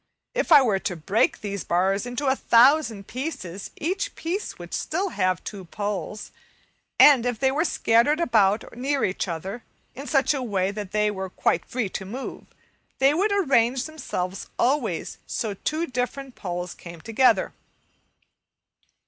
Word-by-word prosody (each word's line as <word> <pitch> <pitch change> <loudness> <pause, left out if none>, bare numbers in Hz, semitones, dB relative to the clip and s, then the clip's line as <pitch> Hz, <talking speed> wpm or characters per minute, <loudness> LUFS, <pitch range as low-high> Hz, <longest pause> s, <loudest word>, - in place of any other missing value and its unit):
If - - -1
I 290 -3 +9
were 210 -6 +1
to 180 - -3
break 190 +7 +1
these 200 -2 -4
bars 190 +6 +1
into 245 +4 -3
a 265 0 +3
thousand 240 -4 +4
pieces, 210 - -5
each 390 +10 -2
piece 360 +6 -4
would 175 -1 -10
still 375 +5 -1
have 185 - 0
two 195 -3 -7
poles, 205 +2 -4 0.7
and 280 -5 +8
if 245 -2 -1
they 265 +3 +2
were 300 +4 +1
scattered 265 0 +2
about 220 - +2
near 270 +3 0
each 190 +1 -2
other 190 +7 -5 0.3
in 275 +3 -8
such 275 0 +3
a 275 - -2
way 195 -5 0
that 205 -2 -6
they 210 0 +2
were 190 -2 -5
quite 170 - 0
free 245 -4 -2
to 195 - -5
move, 240 +8 -7 0.5
they 270 +2 +4
would 395 +7 +1
arrange 265 - +2
themselves 195 -12 -5
always 245 - 0
so 220 -3 -2
two 310 - -2
different 255 0 -4
poles 180 -3 -5
came 170 -1 -11
together. 230 +5 +2
235 Hz, 155 wpm, -25 LUFS, 195-280 Hz, 0.7 s, I